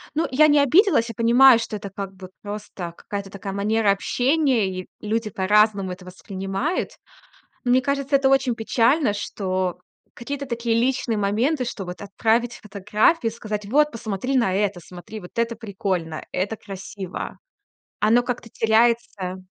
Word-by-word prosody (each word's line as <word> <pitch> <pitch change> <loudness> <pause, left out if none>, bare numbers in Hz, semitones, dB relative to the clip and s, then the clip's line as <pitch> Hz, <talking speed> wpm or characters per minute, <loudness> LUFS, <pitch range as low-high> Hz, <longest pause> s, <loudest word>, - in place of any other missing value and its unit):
Ну, 320 - +1
я 305 +4 +6
не 295 -1 +5
обиделась. 290 - +4
Я 230 - -7
понимаю, 235 +2 +6
что 225 - -4
это 200 -1 -6
как 195 0 -6
бы 185 -1 -11
просто 205 -4 -6
какая-то 200 -1 -6
такая 195 0 -6
манера 210 +1 +2
общения, 250 +2 +1
и 185 -1 -5
люди 220 +1 -1
по-разному 200 0 +2
это 180 0 -9
воспринимают. 195 - -3 0.7
Мне 250 +1 +3
кажется, 280 +1 0
это 270 -1 +3
очень 265 -3 +2
печально, 230 +3 +2
что 185 -3 -2 0.3
какие-то 280 +3 -5
такие 235 -2 -1
личные 245 -2 0
моменты, 240 +8 +1
что 205 -5 -5
вот 180 +2 -8
отправить 225 +4 0
фотографию, 210 - +1
сказать: 210 -2 -5
вот 295 +7 +3
посмотри 230 +3 -3
на 195 -6 +2
это, 195 -2 0
смотри, 180 +6 -10
вот 180 -3 -12
это 230 0 0
прикольно, 190 -7 -3
это 195 +4 -2
красиво. 195 -1 -7 0.6
Оно 225 +3 +5
как-то 245 -2 -4
теряется. 220 -5 +1
220 Hz, 150 wpm, -23 LUFS, 195-245 Hz, 0.7 s, я